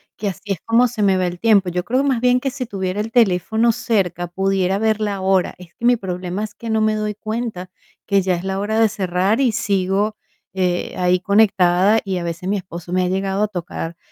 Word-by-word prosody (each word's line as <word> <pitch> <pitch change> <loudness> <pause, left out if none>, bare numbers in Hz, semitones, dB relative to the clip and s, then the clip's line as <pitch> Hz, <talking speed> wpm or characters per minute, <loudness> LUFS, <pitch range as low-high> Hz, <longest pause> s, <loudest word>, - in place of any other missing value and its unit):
que 205 - -2
así 200 +2 -4
es 180 - -8
como 235 +2 +4
se 225 -3 -3
me 195 -2 +3
va 185 -1 +1
el 175 0 -5
tiempo. 205 -2 +3
Yo 180 0 -2
creo, 255 +7 0
más 255 -4 +1
bien, 250 0 +3
que 270 - -2
si 260 -1 -5
tuviera 195 -2 -3
el 220 +1 -5
teléfono 220 +1 +3
cerca, 185 -7 -1
pudiera 190 +1 0
ver 220 -1 +1
la 205 -2 -1
hora. 190 -1 +1
Es 180 -2 -14
que - - -17
mi 245 0 +4
problema 185 +1 -4
es 210 - -12
que 230 - -7
no 220 0 +1
me 215 0 +2
doy 215 0 -2
cuenta 215 -3 -5 0.4
que 200 -1 +2
ya 185 -1 +1
es 175 - -6
la 190 0 -2
hora 215 +2 -1
de 225 - +5
cerrar 190 +3 0
y 250 -4 +3
sigo, 200 +1 0 0.4
eh, 180 -2 -1
ahí 180 0 +2
conectada, 195 0 +3
y 190 -2 -2
a - - -5
veces 170 +2 -5
mi 200 - +1
esposo 175 -2 -7
me 185 0 +2
ha 180 - 0
llegado 195 +2 0
a - - +2
tocar 170 -3 -5
195 Hz, 235 wpm, -20 LUFS, 180-220 Hz, 0.4 s, de